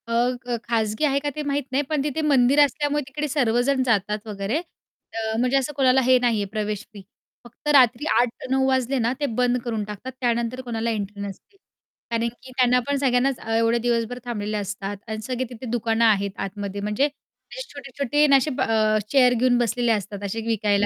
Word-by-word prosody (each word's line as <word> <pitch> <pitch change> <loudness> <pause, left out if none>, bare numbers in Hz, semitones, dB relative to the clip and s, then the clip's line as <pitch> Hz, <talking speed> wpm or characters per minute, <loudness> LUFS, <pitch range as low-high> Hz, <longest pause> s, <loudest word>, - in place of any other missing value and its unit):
अ, 230 - -3 0.3
ख 245 -1 -2
खाजगी 220 0 -1
आहे 280 -1 +2
का 290 - 0
ते 305 - -3
माहीत 280 +1 0
नाही 280 +2 +2
पण 305 -3 0
तिथे 300 +2 -2
मंदिर 280 -2 +4
असल्यामुळे 290 +1 0
तिकडे 295 +2 -3
सर्वजण 260 -1 +1
जातात 210 -1 0
वगैरे 205 +6 -2 0.8
म्हणजे 250 +2 +2
अ, - - +5
असं 270 +3 -4
कोणाला 265 0 +5
हे 255 0 +6
नाही 240 -2 +1
आहे - - -1
प्रवेश 210 -1 -3
फी. 205 - -10 0.4
फक्त 240 - -13
रात्री 260 0 +5
8:00-9:00 255 +2 0
वाजले 260 0 +1
ना 230 - +2
ते 290 - 0
बंद 250 0 +2
करून 225 -3 -2
टाकतात 210 +5 -7
त्यानंतर 235 +1 0
कोणाला 230 -2 -3
एंट्री 205 -1 -4
नसते. 200 - -9 0.5
कारण 230 0 +1
की 245 +2 -10
त्यांना 250 -1 +4
पण 285 0 +1
सगळ्यांनाच 255 0 +2
अ, - - -9
एवढे 230 +1 +3
दिवसभर 240 0 0
थांबलेले 215 -3 -3
असतात 200 0 -4
अन् 220 0 -4
सगळे 255 0 -2
तिथे 245 +1 -9
दुकानं 230 -1 +1
आहेत 200 -3 +3
आतमध्ये 200 0 -5
म्हणजे 210 +7 +2
असे 295 - -10
छोटे-छोटे 280 0 -1
अन् 285 - +4
असे 270 +3 0
ब - - -1
अ, 215 -1 +2
चेअर 255 -3 +5
घेऊन 245 +1 +3
बसलेले 240 0 +1
असतात 205 -1 -2
असे 200 +3 -3
विकायला. 205 -2 +2
240 Hz, 195 wpm, -23 LUFS, 215-265 Hz, 0.8 s, हे